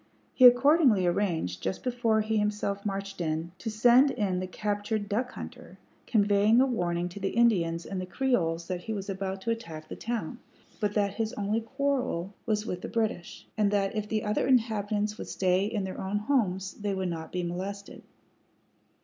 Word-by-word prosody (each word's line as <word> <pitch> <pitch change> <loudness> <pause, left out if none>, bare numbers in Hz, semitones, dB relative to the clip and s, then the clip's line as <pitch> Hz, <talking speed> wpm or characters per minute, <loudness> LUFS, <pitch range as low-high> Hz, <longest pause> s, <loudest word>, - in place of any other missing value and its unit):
He 255 - +6
accordingly 245 - +5
arranged, 175 - 0
just 95 - -3
before 235 -3 +1
he 220 +1 0
himself 205 -1 -1
marched 195 -1 -4
in, 160 +1 -2
to 225 - -4
send 240 +5 +5
in 200 -8 -1
the 185 - -3
captured 205 +2 -2
duck 235 +5 -1
hunter, - - -9 0.3
conveying 205 +1 +4
a 265 - +6
warning 175 -8 -1
to 180 - -9
the 195 0 -1
Indians 175 -8 +2
and 190 -2 -4
the 185 - -6
Creoles 175 -7 0
that 180 0 -4
he 220 - -3
was 195 -1 -4
about 190 0 -4
to 230 - -1
attack 165 -9 -6
the - - -5
town, 235 -1 -4 0.4
but 210 -2 -1
that 200 -2 +1
his 220 0 -2
only 210 +2 -1
quarrel 250 -7 -1
was 210 -1 0
with 180 -5 -4
the - - -5
British, 220 -6 -3
and 210 -2 +2
that 200 0 0
if 210 -1 -3
the 215 -1 -1
other 210 +3 0
inhabitants 215 -4 +1
would - - -6
stay 185 +1 +1
in 210 -1 -2
their 190 -1 -5
own 195 +2 -1
homes 205 -6 0
they 205 -2 -3
would 190 -1 -2
not 160 -1 -5
be 180 -1 -2
molested. 195 +3 -5
205 Hz, 185 wpm, -28 LUFS, 185-225 Hz, 0.4 s, He